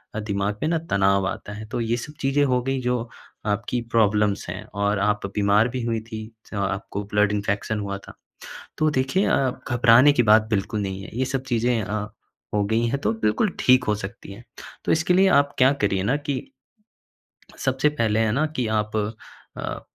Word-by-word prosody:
अ, - - -1
दिमाग 100 -1 -2
पे 155 - 0
ना 165 +1 +1
तनाव 100 -1 +3
आता 105 - -5
है। 105 +1 -7
तो 120 - -2
ये 115 +1 0
सब 150 +5 -7
चीज़ें 135 +1 +2
हो 125 -2 +1
गई 135 +1 -1
जो 125 -1 -1 0.4
आपकी 105 +4 -1
प्रॉब्लम्स 105 -2 +2
हैं 105 - -5
और 100 0 0
आप 105 0 0
बीमार 105 +2 +3
भी 125 +1 -4
हुई 115 -1 -1
थी। 115 0 -8 0.3
स्मा 100 -2 -3
आपको 95 +1 -4
ब्लड 105 0 +3
इंफेक्शन 105 +1 -1
हुआ 100 -1 -3
था। - - -10 0.6
तो 155 - +3
देखिए 135 +8 +1
अ, 135 -2 +2 0.2
घबराने 120 +4 +6
की 125 - +3
बात 110 0 +5
बिल्कुल 105 0 -1
नहीं 95 -1 -4
है, - - -9
ये 130 - +1
सब 130 0 -2
चीज़ें 120 0 +1
अ, 100 +2 -3 0.6
हो 105 -1 +2
गई 110 +3 +1
है 130 - 0
तो 180 +10 0
बिल्कुल 210 - +1
ठीक 125 0 +5
हो 105 - +1
सकती 100 -1 -8
है। 110 +4 -13 0.4
तो - - +1
इसके 160 +2 +2
लिए 190 +2 +5
आप 140 0 -9
क्या 130 0 +5
करिए 100 -2 +1
ना 110 +8 +1
कि 145 -2 -3 1.2
सबसे 135 +2 +1
पहले 115 -7 0
है 110 -1 +2
ना 140 +8 +1
कि 125 -5 0
आप 105 +1 -3 0.6
अ, - - -4
110 Hz, 200 wpm, -23 LUFS, 105-130 Hz, 1.2 s, घबराने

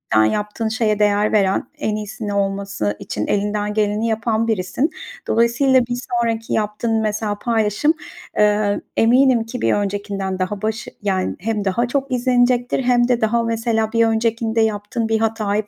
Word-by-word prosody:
yani, 110 0 +4
yaptığın 210 +2 -2
şeye 220 -1 0
değer 210 0 +2
veren, 195 -3 +2
en 215 - -1
iyisini 210 0 -5
olması 195 - -1
için 105 - -4
elinden 210 0 -1
geleni 210 +1 0
yapan 225 0 0
birisin. 220 - 0 0.4
Dolayısıyla 245 +3 +3
bir 245 0 -3 0.2
sonraki 230 -1 -2
yaptığın 220 +1 0
mesela 210 -1 -2
paylaşım, 225 +6 +1 0.4
eee, 210 -1 +2 0.2
eminim 245 +1 +4
ki 235 +2 -7
bir - - +2
öncekinden 200 -2 -2
daha 190 +2 -2
başı 220 +1 -3
yani 190 -2 -1
hem 210 +1 -2
daha 235 +6 +1
çok 275 +1 -2
izlenecektir 245 0 +2
hem 245 -1 +3
de 245 -2 +1
daha 230 +2 +2
mesela 225 -1 0
bir 230 0 +4
öncekinde 225 0 0
yaptığın 220 +2 -1
bir 220 - +2
hatayı 215 -2 -1
220 Hz, 155 wpm, -20 LUFS, 205-230 Hz, 0.4 s, yani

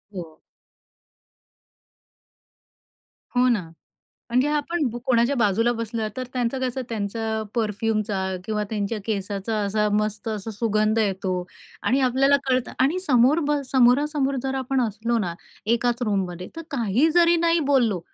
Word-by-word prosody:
हो. 165 -3 -8 3.0
हो 250 - +5
ना. 230 -5 +2 0.7
म्हणजे 255 +4 +3
आपण 305 +3 -1
ब - - -5
कोणाच्या 245 +2 +3
बाजूला 230 +1 +2
बसलो, 230 -1 -3
तर 255 - -3
त्यांचं 250 +1 -1
कसं 260 0 -2
त्यांचा 220 0 -2
परफ्यूमचा 215 -1 -1 0.3
किंवा 210 0 -1
त्यांच्या 210 +1 -2
केसाचा 205 0 -2
असा 210 +1 +1
मस्त 215 +1 -3
असा 215 0 -4
सुगंध 215 0 +1
येतो. 195 -3 0 0.5
आणि 265 +3 +2
आपल्याला 270 +3 +4
कळतं. 255 -1 +1
आणि 280 +8 +2
समोर 275 -3 +4
ब 295 -1 +2
समोरासमोर 270 +2 +3
जर 270 0 -2
आपण 265 0 0
असलो 230 +1 0
ना, 175 -5 -2 0.3
एकाच 235 +2 +1
रूममध्ये, 185 -5 -2
तर 330 - -5
काही 240 +2 +2
जरी 345 0 +5
नाही 335 0 +3
बोललो, 230 -9 +3
230 Hz, 130 wpm, -24 LUFS, 210-260 Hz, 3.0 s, हो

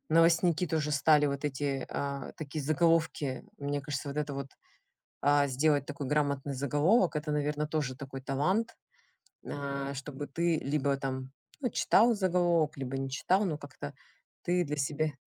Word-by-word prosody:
новостники 165 +2 +4
тоже 155 -1 0
стали 150 +1 +5
вот 140 0 -3
эти, 135 -2 -2
а, 140 -1 -4
такие 155 0 -5
заголовки. 155 -3 +1
Мне 145 0 -2
кажется, 140 +1 -4
вот 140 - -5
это 150 -1 -2
вот, 135 0 -4 0.7
а, 145 0 +4
сделать 145 +2 +2
такой 145 -1 -5
грамотный 140 -1 0
заголовок- 150 - +2
это, 150 0 -2
наверно, 150 0 0
тоже 150 -4 -2
такой 135 -1 -7
талант, 150 - 0 0.7
а, 140 -1 -3
чтобы 145 +1 -6
ты 170 +3 +1
либо 140 -1 0
там, 130 -1 -4 0.3
ну, 250 -4 0
читал 230 +3 +4
заголовок, 175 -5 +2
либо 135 -1 -4
не 135 0 -2
читал, 185 +8 +2
но 160 -6 -1
как-то 140 - -8 0.5
ты 175 0 +2
для 150 -1 -3
себя 150 +2 0
145 Hz, 155 wpm, -30 LUFS, 140-160 Hz, 0.7 s, стали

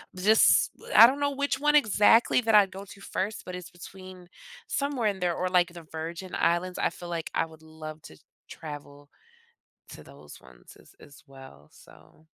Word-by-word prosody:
just 210 +4 +4 0.3
I 230 - +10
don't 270 +3 -2
know 285 0 0
which 280 0 -2
one 295 +1 +2
exactly 225 -2 +4
that 225 -2 0
I'd 200 -2 +5
go 195 +1 -9
to 200 0 -14
first, 200 +2 -4
but 180 - -7
it's 180 -2 -10
between 185 0 -13 0.4
somewhere 280 -5 -2
in 195 -2 -5
there 175 -2 -1
or, 185 - -2
like, 180 -1 +2
the 170 -1 -11
Virgin 165 +3 -7
Islands. 180 +2 0
I - - +1
feel 175 - -10
like 170 -2 -5
I - - 0
would 160 -1 -17
love 155 -1 -10
to 80 - -14 0.3
travel 145 -2 -10 0.8
to - - -11
those 70 +1 -15
ones 65 -2 -18
as - - -21
as 145 -1 -16
well, 135 - -15
so 160 - -20
180 Hz, 185 wpm, -27 LUFS, 160-210 Hz, 0.8 s, I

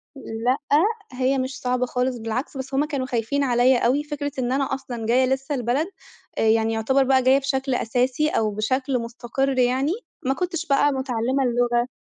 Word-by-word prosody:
لأ، 245 +1 -1 0.6
هي 260 +2 +1
مش 260 +1 -3
صعبة 250 0 0
خالص، 250 0 -1
بالعكس، 230 +5 -4
بس 265 +1 -6
هُم 285 +3 +2
كانوا 280 -4 -3
خايفين 255 +3 -1
عليَّ 250 0 +4
أوي. 270 +6 +2
فكرة 290 -1 -4
إن 245 0 -1
أنا 270 0 0
أصلًا 245 -4 -5
جاية 250 +3 +3
لسه 270 +2 -1
البلد، 250 +7 0 0.5
آآ، - - 0
يعني 225 0 +3
يُعتبر 265 +5 +2
بقى 260 -1 +3
جاية 265 +2 +5
بشكل 270 -1 -1
أساسي 250 +7 +1
أو 215 -6 0
بشكل 255 +5 -1
مستقر 245 +3 -2
يعني، 260 +5 +2 0.3
ما 265 - +2
كُنتش 345 0 -3
بقى 285 +1 +3
متعلمة 260 0 -1
اللغة، 240 0 +1
260 Hz, 175 wpm, -23 LUFS, 240-275 Hz, 0.6 s, جاية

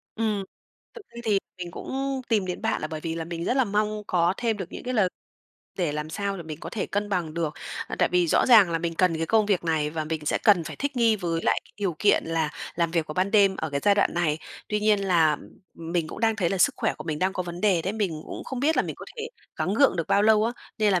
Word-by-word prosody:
Ừm. 215 -3 0 0.5
Thực 465 - -10
ra 235 - -10
thì 210 -3 +3 0.2
mình 175 -1 -5
cũng 270 +8 -3
tìm 210 -5 +2
đến 180 - -4
bạn - - 0
là 155 - -2
bởi 155 -1 -5
vì 165 0 -3
là 165 -1 -4
mình 170 0 -5
rất 250 - 0
là 265 - +4
mong 210 0 -1
có 175 0 +2
thêm 230 -3 0
được 190 -2 -7
những - - -7
cái 255 0 -2
lời 210 -5 +3 0.7
để 170 -5 0
làm 150 +1 -4
sao 200 +3 -2
để 170 - -6
mình 155 -1 -8
có - - -7
thể 215 - -3
cân 205 +1 -2
bằng 175 -6 -2
được. 165 -3 -2 0.3
À, - - -5
tại - - +3
vì 180 -1 +3
rõ - - +3
ràng 220 -8 +7
là 165 - 0
mình 165 0 -3
cần 170 -1 +2
cái 165 - -2
công 220 +1 +3
việc 195 -4 +1
này 155 -2 0
và 155 0 -3
mình 155 -1 -4
sẽ - - +1
cần 200 -6 +5
phải - - -7
thích 285 -1 -3
nghi 230 -3 +4
với 170 -3 -2
lại - - +2
cái - - -23
điều 195 -6 -2
kiện 210 - +3
là 165 -2 -1 0.2
làm 170 -1 0
việc 165 -2 0
vào 155 - -6
ban 185 +3 +1
đêm 200 -3 +4
ở 160 - -3
cái 140 0 -1
giai 205 - +5
đoạn 200 - +2
này. 165 -3 +1 0.3
Tuy 210 0 0
nhiên 210 -1 +3
là 160 -5 +4 0.4
mình 165 0 -2
cũng - - -8
đang 225 -1 +2
thấy 180 -5 +1
là 195 - -1
sức - - +5
khỏe - - 0
của 155 - -9
mình 155 -2 -3
đang 190 +1 +1
có 185 - -2
vấn 175 0 -7
đề 190 -6 +3
đấy, 195 - -2
mình 180 -8 -2
cũng - - -7
không 260 -2 -5
biết 315 +3 +2
là - - +4
mình - - -5
có - - -9
thể 455 0 -4 0.3
gắng 195 - -1
gượng 275 -6 +4
được 165 -2 -1
bao 205 - +4
lâu 215 0 +5
á, 230 - 0 0.3
nên 210 -2 +3
là 180 - +3
185 Hz, 290 wpm, -26 LUFS, 165-215 Hz, 0.7 s, ràng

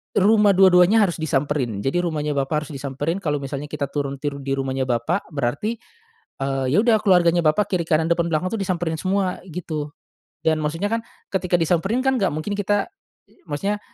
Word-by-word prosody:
rumah 205 0 +5
dua-duanya 190 +3 +6
harus 180 -4 0
disamperin. 140 -8 -1
Jadi 135 +9 0
rumahnya 150 -4 -1
bapak 145 +3 0
harus 150 - -10
disamperin 145 +4 -3
kalo 150 -6 -2
misalnya 140 +1 -5
kita 140 -1 -4
turun 140 -1 -2
turun 140 0 -5
di 135 - +1
rumahnya 135 -1 -2
bapak, 125 +10 -1
berarti, 145 - -1 0.6
eee, 135 -1 -1
ya - - +4
udah 230 -2 +4
keluarganya 175 -3 +4
bapak 160 +6 +2
kiri 175 - +1
kanan 160 0 +2
depan 170 0 +1
belakang 165 +3 0
tuh 220 - -2
disamperin 175 -3 -1
semua 190 +1 -1
gitu. 155 -3 -4 0.5
Dan 160 -1 +2
maksudnya 165 +7 -2
kan, 230 - +1 0.3
ketika 185 -2 0
disamperin 180 +8 +1
kan 265 -1 +2
gak 190 -6 +1
mungkin 180 +7 -3
kita, 205 - 0 0.4
i - - -27
maksudnya, 195 +8 -2
165 Hz, 180 wpm, -22 LUFS, 145-190 Hz, 0.6 s, dua-duanya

